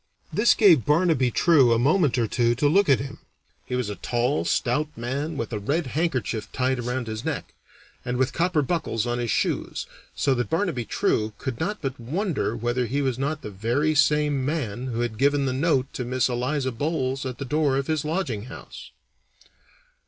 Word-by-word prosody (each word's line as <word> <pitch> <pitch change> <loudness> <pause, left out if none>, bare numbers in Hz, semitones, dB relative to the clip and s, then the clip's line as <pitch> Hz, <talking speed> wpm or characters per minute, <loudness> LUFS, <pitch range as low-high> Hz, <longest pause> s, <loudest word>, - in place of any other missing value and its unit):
This 215 +3 +4
gave 175 - +6
Barnaby 150 -4 +3
True 135 -2 +4
a - - +3
moment 145 +2 +3
or 120 - +2
two 120 +1 +1
to 145 +4 +2
look 190 +4 +3
at 135 - +5
him. 135 0 -6 0.5
He 125 - -2
was 125 -3 -1
a 105 - -4
tall, 125 +4 0
stout 150 +1 +1
man, 140 +6 -3
with 115 -1 -4
a 105 - -1
red 145 +11 -1
handkerchief 130 - -2
tied 130 0 0
around 125 +1 -2
his 110 0 -5
neck, - - -4 0.5
and 125 0 -2
with 130 +1 +1
copper 170 -3 +1
buckles 135 -8 -1
on 120 0 -1
his 120 -1 -2
shoes, - - -1 0.3
so 140 - +2
that 120 -4 -2
Barnaby 165 - -1
True 110 0 0
could 130 -4 -5
not 205 +4 -3
but 135 -1 -3
wonder 155 - -2
whether 120 +2 -1
he 140 +5 -1
was 130 -2 -1
not 145 +2 -2
the 105 - -6
very 120 +10 0
same 150 -2 +2
man 130 -5 -2
who 120 -2 -2
had 115 -2 -3
given 140 0 +3
the 130 - 0
note 135 -2 +1
to 125 - -3
Miss 130 +1 +1
Eliza 130 +2 -1
Bolles 135 0 -2
at 130 -2 -5
the 140 - -5
door 145 -1 +1
of 135 - -1
his 155 -1 -1
lodging 150 - -2
house. 130 - -10
130 Hz, 195 wpm, -25 LUFS, 120-150 Hz, 0.5 s, gave